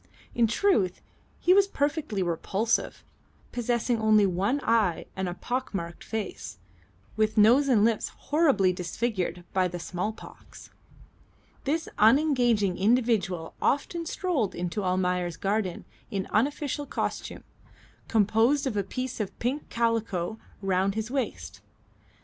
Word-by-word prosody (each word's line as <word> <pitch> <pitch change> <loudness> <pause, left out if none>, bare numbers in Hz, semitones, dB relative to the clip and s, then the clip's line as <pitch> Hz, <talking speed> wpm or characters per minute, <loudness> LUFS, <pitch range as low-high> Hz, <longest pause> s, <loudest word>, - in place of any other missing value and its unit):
In 235 -1 +3
truth 220 - +1 0.4
he 360 - +4
was 395 0 +5
perfectly 285 - -1
repulsive, 195 +6 -1 0.5
possessing 240 -1 0
only 215 -1 +5
one 195 +9 0
eye 210 -8 +2
and 190 -1 -2
a 175 - -5
pockmarked 200 -9 -4
face, 210 - -5 0.6
with 215 0 +1
nose 240 +7 +6
and 220 -6 +4
lips 230 -1 +1
horribly 280 - +2
disfigured 180 -1 -3
by 185 -1 +2
the 175 0 -5
small 180 +4 -3
pox. 220 - -14 0.9
This 320 +4 0
unengaging 235 - +3
individual 205 -6 +1
often 330 +4 0
strolled 315 - -1
into 180 +4 -3
Almayer's 180 -1 0
garden 200 -2 -1 0.2
in 195 -2 -2
unofficial 285 +4 0
costume, - - -4 0.6
composed 225 +6 +3
of 260 -5 -2
a 205 - +2
piece 255 +6 -5
of 210 -3 -4
pink 260 +5 -2
calico 225 -4 -1 0.2
round 195 +1 +1
his 220 +2 -3
waist. 270 -2 -4
220 Hz, 120 wpm, -27 LUFS, 190-255 Hz, 0.9 s, nose